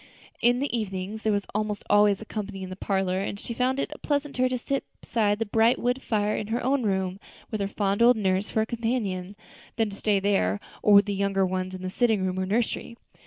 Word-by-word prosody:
In 245 Hz, +1 st, +4 dB
the 280 Hz, -3 st, -1 dB
evening 195 Hz, -2 st, -3 dB
there 220 Hz, 0 st, 0 dB
was 200 Hz, -1 st, 0 dB
almost 210 Hz, -1 st, -2 dB
always 205 Hz, 0 st, +4 dB
company 205 Hz, -3 st, -5 dB
in 185 Hz, -, -7 dB
the -, -, -5 dB
parlor, 190 Hz, -1 st, 0 dB
and 200 Hz, +1 st, -3 dB
she 235 Hz, -, -5 dB
found 255 Hz, +3 st, 0 dB
it 300 Hz, -, -2 dB
pleasanter 285 Hz, -3 st, 0 dB
to 255 Hz, -, -1 dB
sit 275 Hz, +3 st, -2 dB, 0.2 s
beside 210 Hz, -3 st, +1 dB
the 225 Hz, -, -1 dB
bright 225 Hz, +3 st, +3 dB
wood 250 Hz, +2 st, 0 dB
fire 210 Hz, -3 st, 0 dB
in 210 Hz, -, -3 dB
her 230 Hz, +3 st, -2 dB
own 270 Hz, +2 st, +2 dB
room, 190 Hz, -3 st, -1 dB, 0.3 s
with 215 Hz, -2 st, -2 dB
her 200 Hz, -, 0 dB
fond 200 Hz, +1 st, -1 dB
old 240 Hz, 0 st, +6 dB
nurse 190 Hz, -1 st, 0 dB
for 220 Hz, -, +1 dB
a -, -, +1 dB
companion, 220 Hz, -5 st, -2 dB, 0.4 s
than 220 Hz, -2 st, 0 dB
to -, -, -8 dB
stay 205 Hz, -1 st, +1 dB
there, 145 Hz, -, +1 dB, 0.2 s
or 210 Hz, -, +5 dB
with 200 Hz, -, +7 dB
the 205 Hz, -, -2 dB
younger 195 Hz, -1 st, +1 dB
ones 185 Hz, 0 st, -2 dB
in 185 Hz, -, -8 dB
the 185 Hz, -, -3 dB
sitting 220 Hz, -4 st, +2 dB
room 185 Hz, 0 st, -1 dB
or 185 Hz, -, -1 dB
nursery. 230 Hz, +2 st, -1 dB
205 Hz, 225 wpm, -26 LUFS, 195-235 Hz, 0.4 s, with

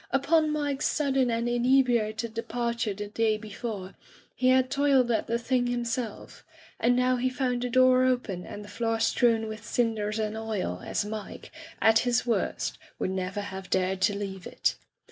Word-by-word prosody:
Upon 310 Hz, +3 st, +2 dB
Mike's 290 Hz, -2 st, -1 dB
sudden 270 Hz, -4 st, +1 dB
and 230 Hz, 0 st, 0 dB
inebriated 240 Hz, -3 st, +2 dB
departure 230 Hz, -2 st, -2 dB
the 205 Hz, +1 st, -5 dB
day 215 Hz, +1 st, +1 dB
before, 210 Hz, -2 st, -6 dB, 0.4 s
he 255 Hz, -, 0 dB
had 255 Hz, 0 st, +4 dB
toiled 275 Hz, -4 st, +3 dB
at 225 Hz, -, 0 dB
the 235 Hz, -, +1 dB
thing 245 Hz, +1 st, 0 dB
himself, 240 Hz, -2 st, -4 dB, 0.4 s
and 245 Hz, +1 st, +3 dB
now 250 Hz, 0 st, +2 dB
he 255 Hz, +1 st, +1 dB
found 250 Hz, -1 st, -1 dB
the 250 Hz, -, -2 dB
door 255 Hz, 0 st, +5 dB
open 245 Hz, -8 st, 0 dB
and 205 Hz, +3 st, -8 dB
the -, -, -12 dB
floor 225 Hz, +1 st, -1 dB
strewn 225 Hz, 0 st, +2 dB
with 215 Hz, 0 st, -7 dB
cinders 225 Hz, -2 st, -1 dB
and 215 Hz, 0 st, -2 dB
oil 215 Hz, -, -3 dB
as -, -, -1 dB
Mike, 210 Hz, -1 st, -7 dB, 0.3 s
at 220 Hz, 0 st, +6 dB
his 245 Hz, 0 st, +1 dB
worst, 235 Hz, -, -1 dB, 0.2 s
would 185 Hz, -, -2 dB
never 190 Hz, +2 st, -3 dB
have 190 Hz, -1 st, -7 dB
dared 190 Hz, 0 st, 0 dB
to 200 Hz, +1 st, +2 dB
leave 195 Hz, -2 st, -5 dB
it. -, -, 0 dB
230 Hz, 170 wpm, -27 LUFS, 210-255 Hz, 0.4 s, at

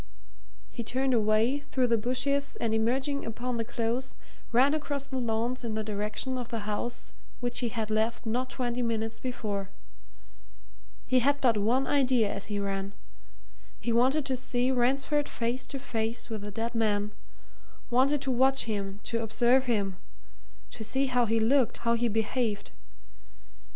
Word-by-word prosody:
He 240 Hz, -, -5 dB
turned 260 Hz, +3 st, 0 dB
away 220 Hz, +4 st, +3 dB
through 265 Hz, -3 st, 0 dB
the 235 Hz, -1 st, +3 dB
bushes 270 Hz, +5 st, 0 dB
and 225 Hz, -1 st, -1 dB
emerging 260 Hz, +6 st, 0 dB
upon 240 Hz, +2 st, -3 dB
the 230 Hz, -, 0 dB
Close 240 Hz, +2 st, -2 dB, 0.4 s
ran 260 Hz, +5 st, +5 dB
across 290 Hz, -2 st, -2 dB
the 265 Hz, -2 st, -3 dB
lawns 235 Hz, +2 st, -1 dB
in 225 Hz, -2 st, -3 dB
the 220 Hz, -, -1 dB
direction 215 Hz, +5 st, -2 dB
of 245 Hz, -, -6 dB
the 230 Hz, -2 st, -3 dB
house 215 Hz, +3 st, -4 dB, 0.3 s
which 245 Hz, 0 st, -1 dB
he 240 Hz, -, 0 dB
had 220 Hz, -1 st, -3 dB
left 220 Hz, +2 st, 0 dB
not 250 Hz, +3 st, -1 dB
twenty 245 Hz, -1 st, -2 dB
minutes 225 Hz, -1 st, -1 dB
before. 210 Hz, -6 st, -3 dB, 1.4 s
He 255 Hz, 0 st, +3 dB
had 285 Hz, +3 st, +2 dB
but 240 Hz, -5 st, +4 dB
one 235 Hz, +6 st, +2 dB
idea 255 Hz, -7 st, +2 dB
as 200 Hz, -, -5 dB
he 205 Hz, -1 st, -2 dB
ran 195 Hz, 0 st, -3 dB, 0.8 s
he 235 Hz, -, -1 dB
wanted 265 Hz, +5 st, +3 dB
to 265 Hz, -, 0 dB
see 250 Hz, 0 st, +1 dB
Ransford 275 Hz, +4 st, +2 dB
face 240 Hz, +2 st, -2 dB
to 275 Hz, -, -4 dB
face 230 Hz, -2 st, -2 dB
with 215 Hz, -2 st, -3 dB
the 205 Hz, -, -5 dB
dead 225 Hz, +3 st, -3 dB
man 210 Hz, -2 st, +1 dB, 0.8 s
wanted 265 Hz, +4 st, +3 dB
to 265 Hz, -, 0 dB
watch 265 Hz, +2 st, +3 dB
him, 200 Hz, -2 st, -3 dB
to 230 Hz, -1 st, -1 dB
observe 235 Hz, +4 st, +3 dB
him, 200 Hz, -6 st, 0 dB, 0.7 s
to 225 Hz, -, -7 dB
see 265 Hz, +5 st, +1 dB
how 250 Hz, -2 st, +2 dB
he 225 Hz, +1 st, +2 dB
looked, 250 Hz, +3 st, +3 dB
how 235 Hz, -, +4 dB
he 235 Hz, +1 st, +1 dB
behaved. 220 Hz, -1 st, -1 dB
235 Hz, 160 wpm, -29 LUFS, 220-260 Hz, 1.4 s, ran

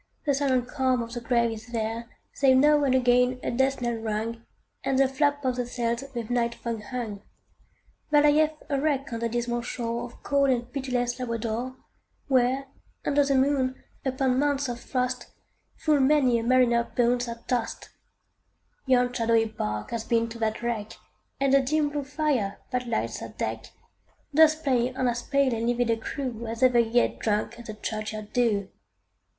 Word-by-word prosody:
The 285 Hz, -, +3 dB
silent 265 Hz, -3 st, +1 dB
calm 260 Hz, -2 st, +1 dB
of 230 Hz, 0 st, -9 dB
the 240 Hz, -, -4 dB
grave 235 Hz, -1 st, +2 dB
is 220 Hz, 0 st, -8 dB
there, 230 Hz, 0 st, -3 dB, 0.2 s
Save 265 Hz, -2 st, +4 dB
now 295 Hz, +2 st, +5 dB
and 260 Hz, -1 st, +3 dB
again 250 Hz, 0 st, +3 dB
a -, -, -1 dB
death 265 Hz, +2 st, +1 dB
knell 240 Hz, 0 st, 0 dB
rung, 225 Hz, +1 st, -3 dB, 0.4 s
And 270 Hz, -, +1 dB
the 270 Hz, 0 st, +5 dB
flap 285 Hz, +1 st, 0 dB
of 255 Hz, -1 st, 0 dB
the 245 Hz, -1 st, -2 dB
sails 235 Hz, 0 st, -2 dB
with 235 Hz, -1 st, -4 dB
night 235 Hz, -1 st, +1 dB
fog 230 Hz, -2 st, -4 dB
hung. 235 Hz, -6 st, -5 dB, 0.9 s
There 295 Hz, -1 st, +5 dB
lieth 305 Hz, +1 st, +3 dB
a 280 Hz, -2 st, 0 dB
wreck 275 Hz, -4 st, 0 dB
on 230 Hz, -, -2 dB
the 230 Hz, 0 st, -1 dB
dismal 240 Hz, +1 st, -1 dB
shore 235 Hz, 0 st, -3 dB
Of 240 Hz, -, -14 dB
cold 280 Hz, -1 st, +2 dB
and 245 Hz, -1 st, -1 dB
pitiless 250 Hz, -2 st, -1 dB
Labrador; 235 Hz, +1 st, -3 dB, 0.5 s
Where, 260 Hz, 0 st, +2 dB, 0.4 s
under 285 Hz, 0 st, +3 dB
the 275 Hz, -1 st, +1 dB
moon, 265 Hz, -1 st, +1 dB, 0.2 s
upon 260 Hz, -1 st, +1 dB
mounts 285 Hz, -1 st, +1 dB
of 240 Hz, -1 st, -4 dB
frost, 250 Hz, -1 st, -2 dB, 0.5 s
Full 305 Hz, -2 st, +2 dB
many 265 Hz, -3 st, +4 dB
a -, -, -3 dB
mariner's 240 Hz, -1 st, +3 dB
bones 245 Hz, 0 st, +2 dB
are 235 Hz, 0 st, -5 dB
tost. 240 Hz, -3 st, -2 dB, 1.0 s
Yon 250 Hz, -1 st, +3 dB
shadowy 230 Hz, -2 st, +2 dB
bark 105 Hz, -, -4 dB
hath 230 Hz, -1 st, -4 dB
been 230 Hz, -1 st, +2 dB
to 230 Hz, 0 st, -9 dB
that 220 Hz, +1 st, -1 dB
wreck, 225 Hz, -3 st, -2 dB, 0.5 s
And 275 Hz, 0 st, +2 dB
the 275 Hz, -, +6 dB
dim 295 Hz, +3 st, +1 dB
blue 290 Hz, 0 st, -3 dB
fire, 275 Hz, -8 st, -1 dB
that 250 Hz, -1 st, -1 dB
lights 230 Hz, -, -2 dB
her -, -, -7 dB
deck, -, -, -3 dB, 0.7 s
Doth 315 Hz, +1 st, +5 dB
play 255 Hz, -2 st, +1 dB
on 260 Hz, -1 st, 0 dB
as 240 Hz, 0 st, -1 dB
pale 275 Hz, -2 st, +1 dB
and 230 Hz, +1 st, -1 dB
livid 240 Hz, -1 st, +1 dB
a 225 Hz, -, +1 dB
crew, 235 Hz, -1 st, -5 dB
As 230 Hz, +2 st, -3 dB
ever 250 Hz, -2 st, +5 dB
yet 235 Hz, +1 st, +2 dB
drank 220 Hz, +2 st, -1 dB
the 215 Hz, -2 st, -7 dB
churchyard 215 Hz, -1 st, -5 dB
dew. 215 Hz, -6 st, +1 dB
245 Hz, 180 wpm, -26 LUFS, 230-270 Hz, 1.0 s, the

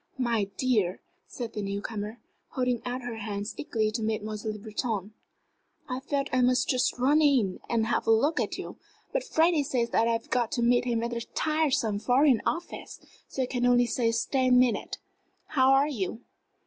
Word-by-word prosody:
"My 235 Hz, -5 st, +1 dB
dear," 215 Hz, -8 st, +1 dB, 0.3 s
said 235 Hz, -3 st, -6 dB
the 210 Hz, -, -3 dB
new 200 Hz, 0 st, -3 dB
comer, 210 Hz, +1 st, -5 dB, 0.4 s
holding 250 Hz, -2 st, 0 dB
out 250 Hz, +1 st, -3 dB
her 240 Hz, -2 st, -5 dB
hands 205 Hz, -1 st, -4 dB
eagerly 220 Hz, -6 st, -1 dB
to 225 Hz, -, -3 dB
Mademoiselle 215 Hz, 0 st, -3 dB
Le -, -, -7 dB
Breton, 215 Hz, -1 st, -3 dB, 0.7 s
"I 255 Hz, -1 st, -3 dB
felt 275 Hz, 0 st, -2 dB
I 255 Hz, -, +3 dB
must 250 Hz, +1 st, +3 dB
just 255 Hz, -1 st, +1 dB
run 280 Hz, +5 st, +3 dB
in 255 Hz, -11 st, +3 dB
and 230 Hz, -2 st, +1 dB
have 235 Hz, -, -1 dB
a -, -, +5 dB
look 280 Hz, +9 st, +3 dB
at -, -, -2 dB
you. -, -, -7 dB, 0.4 s
But -, -, 0 dB
Freddie 330 Hz, -7 st, +3 dB
says 245 Hz, -4 st, -1 dB
that 230 Hz, -, +3 dB
I've 230 Hz, -1 st, -2 dB
got 240 Hz, -3 st, +1 dB
to 240 Hz, -, 0 dB
meet 245 Hz, +1 st, +3 dB
him 235 Hz, -2 st, 0 dB
at 235 Hz, -, -2 dB
that 235 Hz, 0 st, -6 dB
tiresome 290 Hz, -9 st, +1 dB
Foreign 255 Hz, +1 st, +3 dB
Office! 340 Hz, +2 st, -4 dB, 0.3 s
So 265 Hz, -, -2 dB
I -, -, 0 dB
can 245 Hz, -1 st, 0 dB
only 245 Hz, 0 st, +5 dB
stay 235 Hz, -1 st, 0 dB
ten 255 Hz, +2 st, +2 dB
minutes. 250 Hz, -4 st, +1 dB, 0.5 s
How 265 Hz, -3 st, +3 dB
are 270 Hz, +2 st, +5 dB
you?" 225 Hz, -7 st, -3 dB
240 Hz, 185 wpm, -28 LUFS, 220-260 Hz, 0.7 s, a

